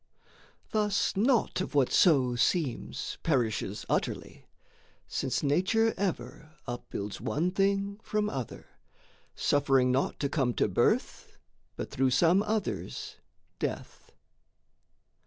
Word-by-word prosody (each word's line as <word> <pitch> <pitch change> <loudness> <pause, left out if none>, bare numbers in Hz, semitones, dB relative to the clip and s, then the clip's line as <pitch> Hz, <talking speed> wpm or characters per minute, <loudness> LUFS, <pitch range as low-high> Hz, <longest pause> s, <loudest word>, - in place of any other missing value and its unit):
Thus 210 -2 +1
naught 225 -2 +2
of 185 - -5
what 135 -3 +3
so 135 -8 +4
seems 135 +1 -1
Perishes 115 -8 -1
utterly, - - -3 0.6
since - - -2
Nature 190 +10 +2
ever 170 -5 -4
Upbuilds 105 -5 -5
one 155 +8 0
thing 200 +1 0
from 210 -1 -1
other, 130 - -5 0.7
suffering 135 -3 +3
naught 130 +2 0
To 140 - +1
come 135 -4 0
to - - +2
birth - - 0 0.4
but - - -6
through 130 0 +2
some 170 +8 +4
other's 215 -1 -3 0.4
death. - - -5
155 Hz, 105 wpm, -29 LUFS, 130-200 Hz, 0.7 s, so